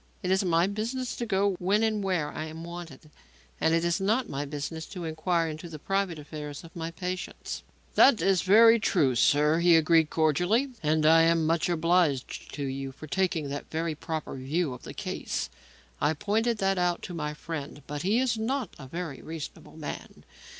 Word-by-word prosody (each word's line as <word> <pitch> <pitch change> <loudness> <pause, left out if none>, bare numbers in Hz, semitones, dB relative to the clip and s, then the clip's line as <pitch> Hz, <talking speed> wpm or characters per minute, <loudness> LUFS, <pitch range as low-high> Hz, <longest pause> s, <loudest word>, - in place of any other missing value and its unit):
"It 180 - 0
is 190 +1 +3
my 170 -1 +3
business 230 +6 -3
to 235 - -3
go 200 -1 +2
when 200 +4 +2
and 215 -2 +1
where 180 -6 0
I 155 - -4
am 160 +1 -8
wanted, 170 -4 -9 0.5
and 160 - +3
it 165 +1 +1
is 170 +3 +1
not 220 +6 +1
my 140 +1 -3
business 150 +2 -5
to 180 -3 -7
inquire 165 +1 0
into 155 +2 -6
the 155 - -7
private 195 +1 -1
affairs 150 0 -7
of 165 - -14
my 165 -1 -3
patients." 180 +2 -5 0.3
"That 250 -5 +6
is 195 -2 +3
very 225 +4 +7
true, 155 -11 +2
sir," 150 +6 +4
he 170 -1 +6
agreed 160 -1 +4
cordially, 175 - +2
"and 155 0 +2
I 165 +1 +7
am 165 -1 +3
much 165 +2 +1
obliged 165 -5 +1
to 145 - -4
you 135 0 -4
for 140 - -11
taking 165 -2 0
that 140 +1 -5
very 160 0 -1
proper 160 -1 -5
view 140 +3 -1
of 125 - -10
the - - -9
case. - - -3 0.5
I 155 - +3
pointed 215 +7 0
that 195 -2 +1
out 175 -1 0
to 180 - -6
my 150 -2 -3
friend, 150 -3 -6
but 145 0 -5
he 200 +7 +2
is 250 -3 +1
not 245 -1 -2
a 135 - -9
very 165 -1 -5
reasonable 160 0 -8
man. 150 -2 -7
165 Hz, 190 wpm, -28 LUFS, 155-190 Hz, 0.5 s, very